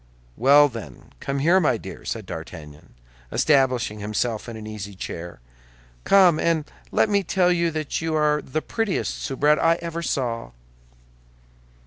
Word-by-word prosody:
"Well, 145 +3 +6
then, 110 - -10
come 140 0 -3
here, 170 +7 +4
my 150 -9 +2
dear," - - -10
said - - -4
D'Artagnan, 75 -4 -10 0.4
establishing 130 -7 +2
himself 110 +2 -2
in 115 - -7
an 110 - -9
easy 105 -2 -7
chair; 85 -6 -7 0.6
"come, 185 -5 +5
and 165 -3 +1 0.3
let - - +3
me 200 -1 +2
tell 180 0 +2
you 170 -1 +1
that 155 -1 -3
you 165 -1 -1
are 150 -1 +2
the 155 +4 -4
prettiest 225 -4 -2
soubrette 145 +2 +2
I 165 0 +4
ever 170 0 -5
saw!" 120 -7 -3
145 Hz, 145 wpm, -23 LUFS, 115-165 Hz, 0.6 s, Well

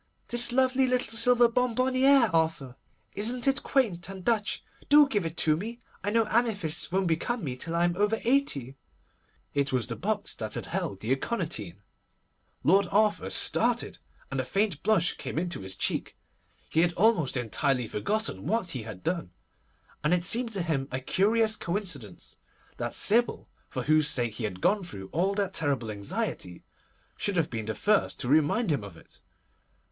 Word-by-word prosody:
'This 240 0 +5
lovely 260 +1 +3
little 250 -2 0
silver 240 +1 +5
bonbonnière, 255 0 +3
Arthur. 160 -6 0 0.4
Isn't 240 +5 +1
it 270 +1 +2
quaint 200 -10 0
and 190 -2 -8
Dutch? 220 -3 0 0.3
Do 295 0 +7
give 205 -10 -1
it 165 +2 -9
to 155 -2 +3
me! 225 +8 -6 0.2
I 205 - 0
know 225 +1 +2
amethysts 200 -10 0
won't 190 +1 +1
become 190 +8 -1
me 130 -4 -3
till 165 +6 -5
I 170 - +2
am 175 0 +1
over 205 +3 +1
eighty.' 225 - 0 0.8
It 140 -1 0
was 125 -3 0
the - - -5
box - - -2
that - - -4
had - - -3
held 100 -1 -4
the 110 - -3
aconitine. 130 - -3 0.8
Lord 195 +3 +4
Arthur 210 +1 +1
started, - - +2 0.3
and - - -2
a - - 0
faint 200 -6 -1
blush 195 -5 +1
came - - -6
into 175 +1 -2
his 95 -1 -5
cheek. - - -2 0.5
He 160 - +2
had 175 0 +2
almost 170 - +2
entirely 125 +2 0
forgotten 175 - -2
what 195 -3 0
he 130 - -2
had 110 -4 -9
done, 170 - -2 0.7
and 150 +4 +3
it 175 -1 -2
seemed 235 +4 +2
to 190 -3 -1
him 145 -5 -1
a 130 - -3
curious 215 - +1
coincidence 170 - -5 0.4
that - - -4
Sybil, 235 +3 +2 0.2
for - - -4
whose 155 -1 +3
sake 120 -5 -1
he 110 +1 -4
had 95 -3 -6
gone 205 0 +2
through 95 - -9
all 190 +5 0
that 195 -2 -1
terrible 135 -8 0
anxiety, 100 -3 -4 0.5
should 200 - -1
have 165 -3 0
been 110 -3 -4
the 110 - -3
first 210 -1 +1
to - - -2
remind 155 - +2
him 140 -8 -1
of 95 -5 -10
it. - - -19
175 Hz, 175 wpm, -28 LUFS, 135-225 Hz, 0.8 s, Do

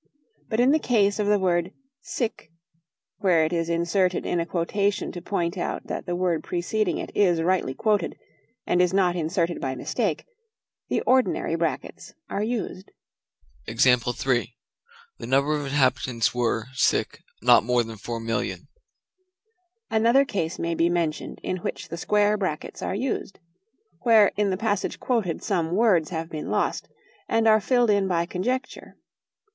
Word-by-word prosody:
But 220 - -1
in 250 +3 +5
the 310 - +3
case 210 -7 +2
of 210 - 0
the 210 0 +4
word 180 -1 0 0.3
sic 245 - -4 0.7
where 175 -6 +3
it 160 - -2
is 165 -1 -1
inserted 170 +2 +1
in 175 - 0
a 170 - -2
quotation 200 +4 -1
to 175 - -7
point 175 -1 -2
out - - -3
that - - -5
the 175 - -1
word 175 -2 0
preceding 180 +2 -1
it - - -6
is 175 -5 +3
rightly 175 -7 0
quoted, 210 -5 0 0.5
and 180 - +2
is 180 +1 +2
not 180 -3 +3
inserted 170 +1 -1
by 130 -1 -2
mistake - - -2 0.6
the - - 0
ordinary 255 0 +2
brackets - - -3 0.2
are 200 - -1
used. 215 -4 -3 0.8
"The 120 +2 +2 0.7
number 140 +3 +1
of 145 -1 -2
inhabitants 130 -5 +1
were 115 -2 0 0.8
not 120 -2 +6
more 120 +1 +2
than 115 -1 -8
four 115 +3 -5
millions." 115 +1 -3 1.3
Another 235 +5 +4
case 170 - -3
may 170 0 -2
be 165 +1 +2
mentioned 170 -3 -2
in 185 - -2
which 175 - -5
the 170 - -5
square 210 +3 +2
brackets 185 -7 -4
are - - -2
used: 240 -3 -3 0.6
where 225 -4 +5
in 205 -1 +1
the 185 - -1
passage 205 -2 -1
quoted 220 -10 -1
some 175 -4 0
words 195 -8 +3
have 165 -2 -4
been 155 -2 -6
lost, - - -1 0.4
and 225 0 +2
are 215 -1 +5
filled 240 +1 +3
in 200 -1 +2
by 170 -2 +1
conjecture. 250 +10 -4
180 Hz, 150 wpm, -25 LUFS, 160-210 Hz, 1.3 s, not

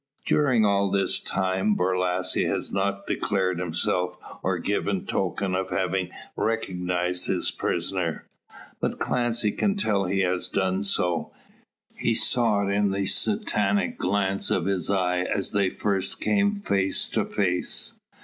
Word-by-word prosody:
During 130 -7 +3
all 100 -1 +2
this 100 0 +1
time 95 +2 0
Borlasse 90 0 +1
has - - -2
not 100 0 -1
declared 95 -3 0
himself, 90 +1 -1 0.2
or 95 -1 0
given 100 +1 -1
token 95 0 -1
of 95 0 -1
having 95 0 -1 0.3
recognised 90 -5 -1
his - - 0
prisoner. - - -2 0.5
But - - -1
Clancy 120 -3 0
can 200 - 0
tell 105 - +1
he 95 +2 0
has 90 -1 0
done 95 0 0
so. 90 -4 0 0.6
He 115 - 0
saw 110 -2 +3
it 100 - -1
in 100 0 +2
the 100 0 -1
Satanic 215 - +1
glance 100 -1 0
of 85 - +1
his 95 -3 0
eye 90 -2 +1
as 95 +2 -1
they 100 -2 +2
first 95 -2 -2
came 205 0 +1
face 95 - +1
to - - 0
face. 90 -3 -1
95 Hz, 140 wpm, -25 LUFS, 90-105 Hz, 0.6 s, During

